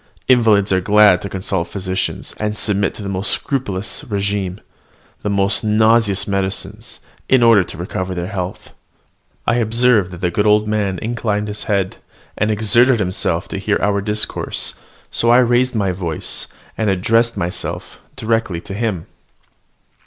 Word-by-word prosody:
Invalids 110 Hz, -6 st, +4 dB
are 95 Hz, 0 st, +2 dB
glad 105 Hz, -1 st, +5 dB
to 100 Hz, -, -5 dB
consult 95 Hz, -2 st, -2 dB
physicians, 95 Hz, +1 st, -3 dB
and 105 Hz, 0 st, -2 dB
submit 100 Hz, -2 st, +1 dB
to 105 Hz, -, -8 dB
the -, -, -5 dB
most 100 Hz, +1 st, -2 dB
scrupulous 105 Hz, -5 st, -2 dB
regimen, 100 Hz, -4 st, -2 dB, 0.6 s
the 105 Hz, -, -2 dB
most 100 Hz, +1 st, +2 dB
nauseous 110 Hz, -2 st, +3 dB
medicines, 95 Hz, -1 st, -3 dB, 0.3 s
in 130 Hz, -2 st, +5 dB
order 115 Hz, -4 st, +6 dB
to -, -, -10 dB
recover 90 Hz, +2 st, -4 dB
their 85 Hz, -1 st, -3 dB
health." 95 Hz, -1 st, -5 dB, 0.7 s
I 120 Hz, -, +2 dB
observed 115 Hz, -3 st, +3 dB
that 90 Hz, -1 st, -10 dB
the 90 Hz, -, 0 dB
good 105 Hz, +4 st, +1 dB
old 105 Hz, 0 st, +4 dB
man 105 Hz, -3 st, -1 dB
inclined 110 Hz, -2 st, -2 dB
his 105 Hz, -, -5 dB
head, 100 Hz, -3 st, -1 dB, 0.4 s
and 105 Hz, -, 0 dB
exerted 115 Hz, +4 st, +3 dB
himself 90 Hz, -3 st, -1 dB
to -, -, -4 dB
hear 105 Hz, +1 st, +1 dB
our 100 Hz, -1 st, +1 dB
discourse; 105 Hz, +1 st, -2 dB, 0.4 s
so 115 Hz, -, +2 dB
I 120 Hz, -, +7 dB
raised 125 Hz, 0 st, +3 dB
my 100 Hz, -3 st, +1 dB
voice, 85 Hz, -4 st, -3 dB, 0.3 s
and 110 Hz, -2 st, +1 dB
addressed 115 Hz, +5 st, +2 dB
myself 85 Hz, +1 st, -4 dB, 0.2 s
directly 110 Hz, -6 st, -1 dB
to 95 Hz, -, -9 dB
him. 105 Hz, -5 st, -2 dB
105 Hz, 150 wpm, -18 LUFS, 95-110 Hz, 0.7 s, I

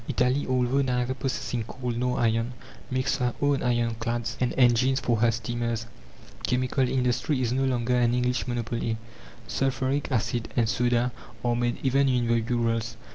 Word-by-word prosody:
Italy, 125 Hz, +3 st, +1 dB
although 130 Hz, +1 st, +2 dB
neither 125 Hz, -1 st, 0 dB
possessing 130 Hz, -3 st, -2 dB
coal 125 Hz, +2 st, -4 dB
nor 125 Hz, +1 st, -1 dB
iron, 115 Hz, +1 st, +1 dB, 0.3 s
makes 130 Hz, +1 st, 0 dB
her 125 Hz, -2 st, -1 dB
own 145 Hz, -1 st, +2 dB
iron 120 Hz, -1 st, +1 dB
clads 115 Hz, 0 st, -2 dB
and 125 Hz, -, +2 dB
engines 130 Hz, +1 st, +4 dB
for 120 Hz, -2 st, +1 dB
her 115 Hz, +2 st, +4 dB
steamers. 115 Hz, 0 st, -2 dB, 0.6 s
Chemical 130 Hz, +1 st, +1 dB
industry 125 Hz, +2 st, +1 dB
is 125 Hz, -1 st, 0 dB
no 135 Hz, +1 st, +1 dB
longer 125 Hz, -1 st, +1 dB
an 120 Hz, 0 st, +3 dB
English 125 Hz, 0 st, 0 dB
monopoly; 115 Hz, -1 st, -2 dB, 0.5 s
sulphuric 135 Hz, +2 st, -1 dB
acid 120 Hz, -1 st, 0 dB
and 115 Hz, -2 st, +3 dB
soda 120 Hz, +1 st, +1 dB, 0.3 s
are 120 Hz, 0 st, +2 dB
made 120 Hz, 0 st, 0 dB
even 135 Hz, +1 st, +3 dB
in 125 Hz, -2 st, +2 dB
the 115 Hz, 0 st, +2 dB
Urals. 115 Hz, -1 st, -1 dB
125 Hz, 160 wpm, -27 LUFS, 120-130 Hz, 0.6 s, engines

